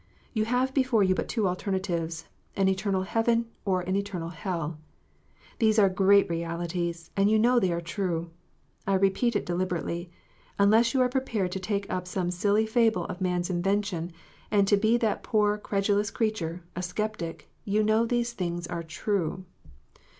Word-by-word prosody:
You 215 -3 +1
have 250 +3 +1
before 255 -6 +3
you 185 -1 +3
but - - -2
two 220 -4 0
alternatives, 180 -3 -2 0.3
an 195 -1 +2
eternal 190 0 0
heaven, 230 +4 +1 0.2
or 185 -2 +1
an 185 +2 -2
eternal 195 -4 -3
hell. 165 -3 -4 0.8
These 220 -2 +3
are 200 -3 +6
great 195 +2 +4
realities, 170 0 -3
and 200 0 +3
you 220 - +4
know 240 +3 +4
they 185 -5 +1
are 170 0 -1
true. 170 -1 -3 0.6
I 195 - +3
repeat 195 +5 +2
it - - 0
deliberately: 175 -1 -2 0.5
unless 220 +5 +4
you 260 - +4
are 250 - +4
prepared 240 -8 -1
to 190 - -3
take 200 +1 -2
up 180 0 -3
some 180 -1 -1
silly 205 +4 +2
fable 220 -5 +2
of 185 +1 -6
man 180 -1 +1
s 175 - -3
invention, 180 -1 -1 0.4
and 200 -2 +3
to 205 - +6
be 220 +3 +3
that 225 -3 0
poor 210 -1 +1
credulous 205 0 0
creature, 185 -6 -2
a 180 - -3
sceptic, 185 -2 -4 0.2
you 210 +1 +1
know 215 +2 +3
these 240 0 0
things 175 -4 -3
are 170 0 -4
true. 185 +2 -2
195 Hz, 170 wpm, -27 LUFS, 175-215 Hz, 0.8 s, are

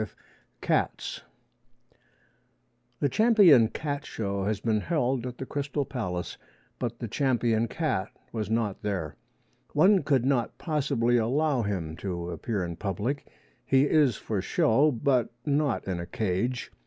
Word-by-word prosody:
V 110 - -2 0.5
CATS - - -1 1.8
The 145 - +3
Champion 195 - +6
Cat 145 +3 -4
Show 100 -6 -3
has 105 0 -1
been 110 0 +1
held 130 -5 0
at 125 -1 -7
the 130 - -5
Crystal 145 +1 -2
Palace, 90 -10 -4 0.4
but 120 -2 -3
the 115 - -5
champion 115 -2 +1
cat 130 - -1 0.2
was 110 -3 -3
not 110 -3 -1
there. 95 -8 -3 0.6
One 185 +6 +5
could 135 -5 +1
not 130 -4 0
possibly 140 -7 +1
allow 135 +4 +1
him 90 -7 -3
to 90 -2 -4
appear 95 +3 -2
in 85 -1 -6
public. 105 +8 -3 0.4
He 135 0 +3
is 145 -5 +3
for 105 -3 -3
show, 115 +9 +3
but 125 -1 +1 0.2
not 145 -5 0
in 90 -2 -2
a 85 - -5
cage. 110 +6 -2
120 Hz, 140 wpm, -27 LUFS, 100-140 Hz, 1.8 s, Champion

